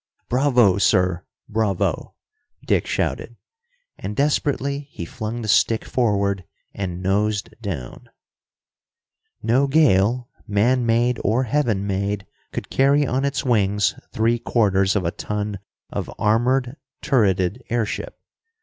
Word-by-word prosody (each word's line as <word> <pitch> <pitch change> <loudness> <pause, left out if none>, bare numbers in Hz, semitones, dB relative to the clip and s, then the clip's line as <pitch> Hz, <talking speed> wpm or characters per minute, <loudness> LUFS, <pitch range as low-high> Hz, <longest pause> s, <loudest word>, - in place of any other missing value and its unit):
"Bravo, 125 -7 +3
sir, 90 -3 +2 0.2
bravo!" 105 -4 -1 0.5
Dick - - +1
shouted. - - -2 0.6
And 105 - -5
desperately 140 0 0
he 85 - -7
flung 115 +5 -5
the - - -4
stick 110 +2 +3
forward 100 -5 0 0.3
and 90 -2 -4
nosed 100 +2 0
down. 100 - -6 1.3
No 130 +5 +3
gale, 125 -5 +3 0.2
man 120 +4 +2
made 120 +1 +2
or 115 +6 +2
heaven 115 -6 0
made, 100 0 -2 0.3
could - - -6
carry 140 +2 +3
on 130 +1 0
its 140 0 -1
wings 105 -4 +2 0.2
three 115 +2 +1
quarters 100 -5 +2
of 95 -4 0
a 85 - 0
ton 105 0 -4 0.3
of - - -4
armored, 125 +5 +1 0.3
turreted 105 - +2
airship. 120 - -2
110 Hz, 115 wpm, -22 LUFS, 100-125 Hz, 1.3 s, Bravo